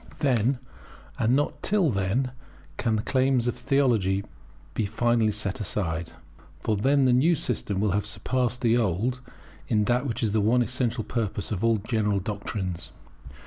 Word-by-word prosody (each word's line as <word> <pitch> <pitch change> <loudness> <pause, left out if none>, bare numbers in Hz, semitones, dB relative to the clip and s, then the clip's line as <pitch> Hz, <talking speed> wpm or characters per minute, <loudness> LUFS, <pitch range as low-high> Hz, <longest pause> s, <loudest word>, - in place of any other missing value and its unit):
Then, 130 -1 +2 0.6
and 115 +3 +3
not 145 +1 -1
till 195 -8 +2
then, 105 +6 0 0.5
can 115 -2 +1
the 105 - -1
claims 130 -2 +2
of 120 - 0
theology 110 -9 +1 0.5
be 105 - -1
finally 115 0 +2
set 100 -2 -2
aside. 85 -5 -2 0.5
For 110 - 0
then 135 +6 +3
the 125 - +4
new 155 +8 +4
system 105 -8 -2
will 105 -1 +2
have 105 +2 0
surpassed 125 +3 -1
the 120 -1 +3
old 115 +4 0 0.5
in 105 -3 +2
that 125 +6 +1
which 115 0 -2
is 110 - +1
the 110 0 +2
one 120 +4 +3
essential 120 -2 -1
purpose 105 -3 -3
of 105 0 -2
all 115 -1 +4
general 105 -1 0
doctrines. 95 -4 -4
115 Hz, 160 wpm, -26 LUFS, 105-125 Hz, 0.6 s, the